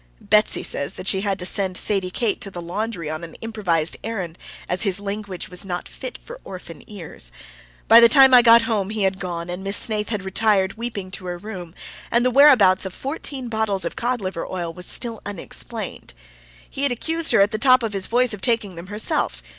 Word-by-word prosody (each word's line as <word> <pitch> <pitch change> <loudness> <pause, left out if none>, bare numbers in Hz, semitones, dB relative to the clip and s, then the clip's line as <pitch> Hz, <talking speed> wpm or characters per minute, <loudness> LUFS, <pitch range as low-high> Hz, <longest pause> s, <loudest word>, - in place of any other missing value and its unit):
Betsy 210 0 +2
says 140 - -3
that 185 - -8
she 190 -1 +2
had 200 -1 -1
to 180 - -3
send 185 -1 -1
Sadie 195 -3 0
Kate 215 +2 -1
to - - -2
the 180 - -8
laundry 175 0 -4
on 155 +2 -5
an 165 - -9
improvised 185 -8 -1
errand, 190 -7 -5 0.3
as 180 +1 -1
his 195 -2 0
language 200 -2 -5
was 180 +1 -2
not 180 -2 -5
fit - - -8
for - - -12
orphan 175 -4 -9
ears. 165 - -9 0.6
By 230 - +9
the 235 0 +7
time 270 -1 +7
I 250 - +9
got 235 -1 +7
home 215 -4 -1
he 215 -1 -2
had 190 0 0
gone, 175 -2 -4
and 180 +2 -6
Miss 195 +1 0
Snaith 210 -2 +1
had 210 -4 -3
retired, 195 0 +1
weeping, 220 -5 -6
to 185 -1 -7
her 175 0 -4
room, 180 -3 -9 0.3
and 240 +1 +2
the 255 - +3
whereabouts 245 -9 +6
of 190 -2 -5
fourteen 275 -2 -5
bottles 220 -4 -1
of - - -4
cod 245 0 -2
liver 185 -3 -4
oil 175 -3 -4
was 180 +1 -7
still 230 -2 -2
unexplained. 200 - -5 0.5
He 270 - -7
had 280 -2 +2
accused 325 +7 0
her - - +5
at 200 +2 +3
the 215 - -2
top 255 0 +5
of 220 -2 -3
his 195 -2 -2
voice 245 0 +2
of 205 - -7
taking 225 -5 0
them 170 +1 -9
herself. 195 - -2
200 Hz, 215 wpm, -22 LUFS, 185-230 Hz, 0.6 s, By